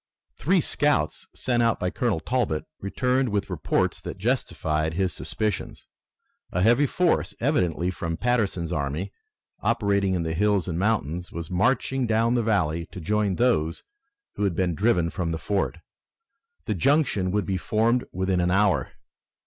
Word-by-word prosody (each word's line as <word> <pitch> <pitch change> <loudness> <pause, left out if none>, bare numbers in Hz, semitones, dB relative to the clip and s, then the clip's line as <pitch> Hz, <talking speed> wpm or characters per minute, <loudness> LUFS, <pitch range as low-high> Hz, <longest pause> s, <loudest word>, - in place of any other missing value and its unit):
Three - - +2
scouts, - - +1
sent 120 -2 0
out 115 -2 +2
by 90 - -1
Colonel 115 -9 0
Talbot, 120 -8 -1
returned 125 +6 0
with 105 -1 -2
reports - - 0
that - - -6
justified 80 -8 -1
his 95 -2 0
suspicions. 105 -5 -3 0.7
A 90 - 0
heavy 120 +7 +4
force, 180 +4 +1
evidently 90 - +1
from 85 -2 -4
Patterson's 105 -9 0
army 75 +7 -2 0.5
operating 100 -3 +1
in 85 - -1
the 80 0 -2
hills 100 +1 +1
and 85 -1 -2
mountains, 90 -5 -1
was 85 0 -6
marching 125 +6 +1
down 115 +2 +2
the 120 - +2
valley 85 -7 0
to 90 - -9
join 105 +2 0
those 85 -10 +1 0.5
who - - -1
had 95 -4 +1
been 90 -1 +1
driven 90 -3 +2
from 85 -4 -2
the 80 - -2
fort. 100 +5 -1 0.9
The - - 0
junction 135 -10 +2
would 105 +2 0
be 95 -1 -1
formed 115 +8 +1
within 95 0 0
an 90 0 +2
hour. 100 +1 +2
100 Hz, 155 wpm, -25 LUFS, 85-115 Hz, 0.9 s, heavy